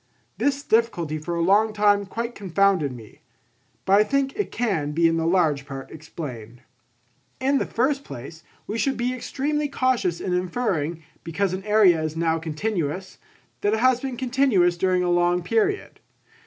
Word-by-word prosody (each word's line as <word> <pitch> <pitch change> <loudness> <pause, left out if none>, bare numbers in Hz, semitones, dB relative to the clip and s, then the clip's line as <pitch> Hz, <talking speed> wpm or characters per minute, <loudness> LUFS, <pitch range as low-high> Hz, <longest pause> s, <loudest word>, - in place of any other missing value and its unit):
This 280 0 0
difficulty 175 - +1
for 170 +3 -4
a 170 - 0
long 210 +4 +3
time 205 -1 +3
quite 235 +4 -4
confounded 195 - +1
me. 115 -4 -12 0.6
But 195 +1 +5
I - - +6
think 275 +3 0
it 415 0 -2
can 165 -11 -1
be 165 +2 +4
in 165 0 +1
large 165 -4 +1
part 135 -2 -8
explained. 130 -7 -9 0.8
In 270 +2 +2
the - - -2
first 275 +4 0
place 140 +7 -9 0.2
we 225 - -4
should 270 +2 0
be 245 +1 -1
extremely 295 +4 -2
cautious 255 - 0
in 180 - -2
inferring, 180 -4 -1 0.2
because 180 +3 -1
an 190 +1 -4
area 205 -6 +4
is 155 0 -3
now 165 0 +1
continuous, 170 +1 -3 0.4
that 205 +1 +2
it - - -2
has 255 0 +3
been 265 -3 -4
continuous 240 -9 +2
during 180 0 +1
a 175 - +1
long 175 0 +2
period. 405 - -1
190 Hz, 165 wpm, -24 LUFS, 165-240 Hz, 0.8 s, I